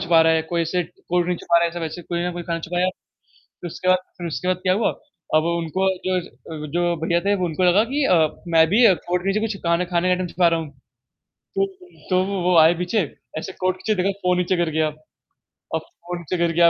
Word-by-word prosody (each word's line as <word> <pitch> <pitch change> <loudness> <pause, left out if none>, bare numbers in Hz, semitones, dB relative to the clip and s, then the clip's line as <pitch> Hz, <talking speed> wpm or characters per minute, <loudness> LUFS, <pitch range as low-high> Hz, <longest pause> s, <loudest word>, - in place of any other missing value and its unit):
छुपा 170 -3 +4
रहा 160 0 +4
है 160 0 +2
कोई 170 +1 -2
ऐसे 175 +2 0
कोल्ड 175 +1 -2
ड्रिंक 180 -1 -2
छुपा 170 - +2
रहा 170 - +2
है 170 - 0
ऐसा 175 0 -6
वैसे 165 +2 -5
कोई 170 +1 -3
ना 180 - -1
कोई 175 0 -5
खाना 165 0 -2
छुपाया। 180 +1 0 0.6
तो 175 - -12
उसके 185 +2 -4
बाद 185 0 +5 0.2
फिर 175 - -4
उसके 175 +3 -3
बाद 185 - +2
क्या 185 - +3
हुआ? 215 +1 +2 0.4
अब 155 +1 +4
उनको 170 +3 0 0.2
जो 185 -1 +1
ज 175 - -11
अ, 155 -2 -9
जो 175 0 +2
भैया 170 0 +2
थे 200 +2 +1
उनको 170 +2 -2
लगा 185 +5 +5
कि 290 0 +1
अ, 165 - +4 0.2
मैं 165 -1 +5
भी 225 +7 +4
अ, 190 - +6
कोट 180 0 0
में 195 - +3
जो 215 - 0
कुछ 220 -2 -2
खाना 170 +1 +2
खाने 175 0 0
का - - +4
आइटम 180 0 0
छुपा 175 -1 +4
रहा 165 -1 +1
हुँ। 155 -3 -7 0.9
तो 390 0 +3 0.4
तो 185 0 +3 0.2
वो 180 -1 +3
आए 160 +2 +7
पीछे 180 +5 -1 0.4
ऐसे 190 +4 -6
कोट 185 0 +1
के 215 +3 -1
पीछे - - +3
देखा 195 - +2
फ़ोन 180 0 +2
नीचे 180 +1 +1
गिर 170 -2 0
गया। 155 0 +1 0.9
अब 160 - -1
फ़ोन 175 0 -8
गिर 170 -1 +1
गया 170 0 +5
175 Hz, 250 wpm, -22 LUFS, 170-185 Hz, 0.9 s, आए